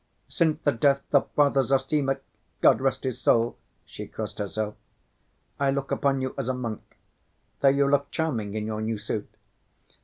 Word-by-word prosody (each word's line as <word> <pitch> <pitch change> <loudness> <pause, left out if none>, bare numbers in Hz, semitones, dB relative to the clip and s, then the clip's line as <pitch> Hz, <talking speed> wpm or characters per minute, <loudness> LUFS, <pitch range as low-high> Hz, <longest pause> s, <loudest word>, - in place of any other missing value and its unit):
Since 160 -4 +1
the 145 - +4
death 140 +2 +2
of 140 - +4
Father 140 -2 +4
Zossima—God 135 -4 +1
rest 135 0 0
his 130 -3 -3
soul!" 115 +1 +3 0.3
(she - - -8
crossed - - -6
herself)—"I 105 - -5
look 135 0 -1
upon 135 -1 +1
you 130 - -2
as 130 -2 -2
a 130 - 0
monk, 115 -4 -4 0.8
though 140 - +3
you 140 +1 +4
look 140 0 +2
charming 115 -11 -2
in 105 0 -2
your 110 0 -3
new 110 0 -1
suit. 105 0 -4
135 Hz, 155 wpm, -26 LUFS, 110-140 Hz, 0.8 s, the